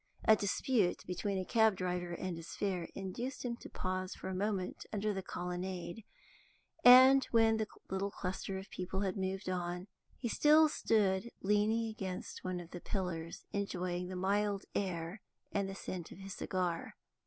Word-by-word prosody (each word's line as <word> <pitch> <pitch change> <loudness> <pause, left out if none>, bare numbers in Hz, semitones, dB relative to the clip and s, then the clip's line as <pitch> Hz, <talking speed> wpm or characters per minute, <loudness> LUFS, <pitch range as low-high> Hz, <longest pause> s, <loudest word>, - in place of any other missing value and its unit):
A 220 - +8
dispute 205 0 +1
between 195 +2 -2
a 185 - -2
cabdriver 185 -6 +2
and 180 0 -3
his 165 0 -8
fare 185 -4 -1
induced 235 +8 -4
him 235 -1 -1
to - - -10
pause 185 0 -3
for 190 - -6
a - - -3
moment 195 -1 -2
under 210 0 0
the 190 - -3
colonnade, 180 +2 -4 0.8
and, 260 +2 +10
when 225 -1 +4
the 220 -1 -1 0.2
little 190 +1 -1
cluster 190 0 -4
of 190 +1 -8
people 185 +1 -3
had 190 -2 0
moved 190 0 -2
on, 180 0 -2 0.3
he 245 - -3
still 305 +6 +6
stood 210 -5 +2
leaning 210 +3 +2
against 190 -4 -5
one 185 -1 -2
of 175 -1 -10
the 175 - -7
pillars, 170 -4 -4
enjoying 180 -3 -2
the 185 - -5
mild 200 +2 +1
air 180 0 -2 0.3
and 200 -1 0
the 195 - -5
scent 180 -3 -6
of - - -10
his 195 0 -7
cigar. 180 -3 -2
190 Hz, 165 wpm, -34 LUFS, 180-210 Hz, 0.8 s, and